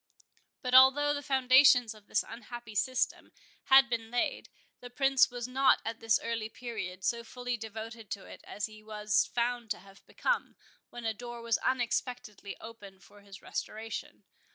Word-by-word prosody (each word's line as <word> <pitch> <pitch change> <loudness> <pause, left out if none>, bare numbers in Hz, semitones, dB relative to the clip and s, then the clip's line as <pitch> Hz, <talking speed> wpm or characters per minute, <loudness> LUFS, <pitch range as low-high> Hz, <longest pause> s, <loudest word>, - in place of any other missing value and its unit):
But 250 0 -2
although 270 +3 +7
the 285 - -3
foundations 260 -3 +5
of 215 -2 -18
this - - +1
unhappy 235 -1 -9
system 250 +5 -1 0.3
had 270 -1 +7
been 230 -2 -3
laid, 245 +1 -1 0.3
the 245 - -10
Prince 270 +1 +3
was 245 -1 -5
not 265 +1 +4
at 225 0 -4
this 225 -1 +2
early 230 -1 -3
period 205 -7 -6
so 235 +4 0
fully 245 +1 -4
devoted 225 0 -8
to 200 - -5
it - - -12
as 205 - -4
he 215 0 -12
was 210 -1 0
found 240 -1 -2
to 210 - -1
have 195 0 -18
become, - - -1 0.3
when 240 -1 -9
a 225 - 0
door 240 +1 -8
was 230 -1 +1
unexpectedly 245 -5 -2
opened 200 -4 -12
for 205 0 -18
his 200 -2 -13
restoration. 225 +1 -6
235 Hz, 165 wpm, -31 LUFS, 215-250 Hz, 0.3 s, although